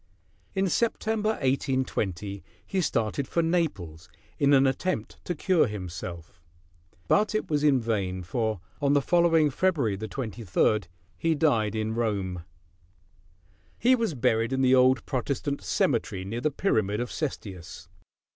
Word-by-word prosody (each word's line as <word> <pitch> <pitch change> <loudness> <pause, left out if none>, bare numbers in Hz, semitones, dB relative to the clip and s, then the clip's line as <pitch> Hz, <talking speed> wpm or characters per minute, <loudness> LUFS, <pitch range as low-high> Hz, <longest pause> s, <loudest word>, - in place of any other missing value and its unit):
In 195 0 +2
September, 220 +1 0
1820, 105 -8 -1 0.2
he 190 - -1
started 125 -3 -1
for 170 - 0
Naples 140 - -2 0.3
in 140 0 +4
an 135 -1 +6
attempt 135 -2 -2
to 175 - -2
cure 170 -1 +2
himself; 90 -4 -7 0.7
but 210 - +2
it 215 - -2
was 145 -1 +1
in 140 -3 +4
vain, 100 -6 -2
for 110 +2 -1 0.2
on 140 0 +3
the 145 - +4
following 165 -3 +3
February 135 - +1
23 110 -2 0 0.4
he 165 -1 +1
died 115 -9 +2
in 110 0 -1
Rome. 100 -6 -2 1.3
He 250 +2 +4
was 230 - 0
buried 115 -1 +1
in 135 0 +1
the 130 0 +5
old 130 -1 +4
Protestant 140 +1 -2
cemetery 115 - 0
near 115 +5 -4
the 155 - +2
pyramid 110 - 0
of 120 - -3
Cestius. 95 - -6
130 Hz, 135 wpm, -27 LUFS, 105-155 Hz, 1.3 s, an